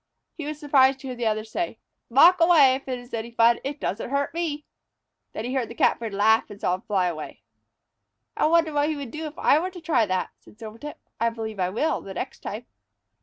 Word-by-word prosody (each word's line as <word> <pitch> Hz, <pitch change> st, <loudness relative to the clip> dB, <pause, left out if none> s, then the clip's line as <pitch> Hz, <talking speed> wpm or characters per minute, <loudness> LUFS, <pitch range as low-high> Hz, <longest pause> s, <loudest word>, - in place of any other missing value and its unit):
He 310 Hz, -4 st, -7 dB
was 300 Hz, 0 st, -5 dB
surprised 275 Hz, -3 st, +4 dB
to 270 Hz, -, -7 dB
hear 250 Hz, -, -5 dB
the 240 Hz, -2 st, -1 dB
other 215 Hz, 0 st, 0 dB
say: 335 Hz, +11 st, -4 dB, 0.3 s
"Mock 330 Hz, +9 st, +6 dB
away, 320 Hz, -6 st, +6 dB
if 270 Hz, +1 st, -5 dB
it 255 Hz, -1 st, -2 dB
is 245 Hz, 0 st, -14 dB
any 230 Hz, 0 st, -3 dB
fun! 235 Hz, 0 st, +3 dB
It 285 Hz, +2 st, -5 dB
doesn't 210 Hz, +5 st, -3 dB
hurt 280 Hz, +2 st, -1 dB
me 340 Hz, 0 st, -1 dB
any." 295 Hz, +1 st, -8 dB, 0.7 s
Then 215 Hz, -, -5 dB
he 250 Hz, -, -3 dB
heard 260 Hz, -4 st, -1 dB
the 235 Hz, -, -9 dB
Catbird 230 Hz, -2 st, +1 dB
laugh 215 Hz, +3 st, +3 dB
and 205 Hz, -, -11 dB
saw 180 Hz, -, 0 dB
him 185 Hz, -, -3 dB
fly 195 Hz, -3 st, 0 dB
away. 160 Hz, -4 st, -5 dB, 0.9 s
"I -, -, +2 dB
wonder 325 Hz, -1 st, +3 dB
what 290 Hz, +1 st, +1 dB
he 310 Hz, -, -1 dB
would 280 Hz, -5 st, -7 dB
do 315 Hz, +1 st, -5 dB
if 300 Hz, -, -11 dB
I 290 Hz, -, +4 dB
were 365 Hz, +3 st, -2 dB
to 365 Hz, -1 st, -11 dB
try 275 Hz, -10 st, +1 dB
that?" 185 Hz, -1 st, -1 dB
said -, -, -19 dB
Silvertip. 230 Hz, +6 st, -9 dB, 0.2 s
"I 230 Hz, +1 st, +2 dB
believe 220 Hz, -2 st, -6 dB
I 180 Hz, -1 st, +1 dB
will 290 Hz, +10 st, -1 dB
the 195 Hz, -1 st, -9 dB
next -, -, -5 dB
time." 220 Hz, +4 st, -6 dB
250 Hz, 235 wpm, -25 LUFS, 220-295 Hz, 0.9 s, Mock